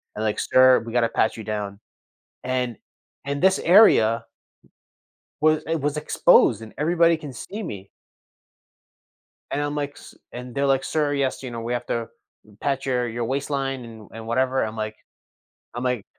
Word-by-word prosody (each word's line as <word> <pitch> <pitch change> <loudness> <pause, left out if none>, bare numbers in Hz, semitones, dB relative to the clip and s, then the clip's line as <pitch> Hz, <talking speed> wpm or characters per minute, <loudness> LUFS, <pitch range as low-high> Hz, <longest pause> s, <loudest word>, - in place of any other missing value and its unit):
and, 110 - -3
like, 105 - -1
"Sir, 130 0 +5
we 115 - -7
gotta 115 -2 +2
pat 110 - +1
you 110 - -7
down." 105 -1 -4 0.6
And 125 -3 -2 0.5
in 140 0 -2
this 190 0 +4
area 120 - +5 1.2
was 155 0 +3
it 165 -3 -1
was 145 +1 -1
exposed 120 - +4
and 110 - -10
everybody 170 +2 +3
can 145 -4 -9
see 205 - -7
me. 100 - -7 1.6
And 145 - -1
I'm, 145 0 -2
like, 145 -1 -2
"s" - - -14 0.2
and 125 0 -8
they're, 140 0 +1
like, 135 -1 +2
"Sir, 150 -2 0
yes, 135 -1 -1
you 125 - -6
know, 115 -1 -5
we 120 +2 -3
have 120 0 -3
to 115 -1 -2 0.5
pat 135 -1 -1
your 125 -2 0
your 115 0 -3
waistline 135 0 -2
and 110 -2 -12
and 115 0 -9
whatever." 130 +2 +1
I'm 110 0 -4
like 110 0 -4 0.8
I'm 120 +1 -4
like 125 -5 -1
130 Hz, 170 wpm, -23 LUFS, 115-145 Hz, 1.6 s, Sir